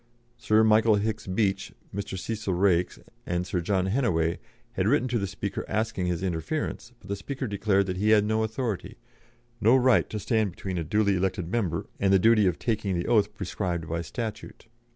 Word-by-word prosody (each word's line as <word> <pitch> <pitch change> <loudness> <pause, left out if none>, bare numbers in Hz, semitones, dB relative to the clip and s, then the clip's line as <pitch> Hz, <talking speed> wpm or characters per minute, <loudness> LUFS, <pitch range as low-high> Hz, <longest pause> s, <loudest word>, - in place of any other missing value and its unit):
Sir 110 -2 +3
Michael 110 0 +5
Hicks 105 +1 -2
Beach, 95 0 0 0.2
Mr. 100 0 -4
Cecil 105 -1 -3
Raikes, 90 -1 +2 0.3
and 90 0 -1
Sir 90 -1 -2
John 95 +1 0
Hennaway 95 -7 +1 0.3
had 95 +1 -1
written 130 +1 +3
to 120 -1 0
the 100 - -2
Speaker 100 +1 -4
asking 110 -4 -1
his 90 0 -2
interference, 105 - -3
but - - -16
the 100 - -2
Speaker 130 +7 -5
declared 100 -2 +1
that 90 -1 -3
he 105 +3 +1
had 105 -1 +5
no 110 +1 +1
authority, 110 -2 -3 0.6
no 115 +4 +5
right 130 -1 +4
to 110 - -4
stand 110 0 +1
between 95 0 -5
a - - -2
duly 100 +4 +2
elected 90 -2 -2
member 105 -8 -1
and 100 -1 +2
the 95 - +6
duty 110 0 +4
of 90 - 0
taking 105 -5 -1
the 85 - -2
oath 105 -3 +2
prescribed 90 -3 -3
by 85 +1 -2
statute. 110 +6 -6
100 Hz, 190 wpm, -27 LUFS, 90-110 Hz, 0.6 s, the